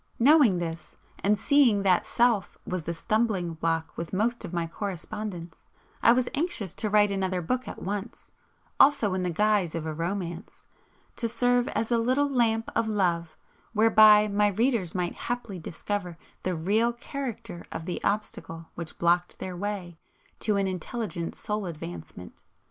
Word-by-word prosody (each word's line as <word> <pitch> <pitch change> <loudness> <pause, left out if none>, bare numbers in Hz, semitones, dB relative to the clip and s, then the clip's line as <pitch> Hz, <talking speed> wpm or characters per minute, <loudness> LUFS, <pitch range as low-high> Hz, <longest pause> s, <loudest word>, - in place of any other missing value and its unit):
Knowing 260 - +6
this, 165 -1 -5 0.3
and 205 +1 +3
seeing 240 -5 +4
that 185 -2 +3
Self 235 -5 +1
was 180 -3 -3
the 170 - -2
stumbling 210 -3 0
block 165 0 -2
with 165 +2 -6
most 225 +5 0
of 180 - -6
my 170 -2 -1
correspondents, 180 -1 -6 0.4
I - - +7
was 245 +1 +2
anxious 285 - -2
to 215 - -2
write 205 -1 +4
another 190 -2 -1
book 250 +9 -2
at - - -7
once, 205 +3 -5 0.5
also 275 -9 +5
in 185 - -1
the 180 - -1
guise 200 -1 +2
of 165 -1 -3
a 160 - -3
romance, 175 +2 -5 0.5
to 230 - -1
serve 245 +1 +2
as 225 - -2
a 235 - +3
little 255 +5 +2
lamp 230 -4 +1
of 230 -1 +1
love 175 -6 0 0.4
whereby 215 -1 +7
my 205 0 +2
readers 210 -3 0
might 180 -1 -1
haply 235 -6 -4
discover 180 +1 -4 0.2
the 185 -1 -1
real 215 +8 +1
character 240 -8 -6
of 160 - -5
the 180 - -4
obstacle 165 -5 -3
which 170 -2 -8
blocked 175 +1 +1
their 185 -1 -5
way 180 -3 -4 0.4
to 210 -1 +1
an 200 - +1
intelligent 185 -1 -4
Soul 210 -2 -3
advancement. 90 - -8
200 Hz, 160 wpm, -27 LUFS, 175-230 Hz, 0.5 s, I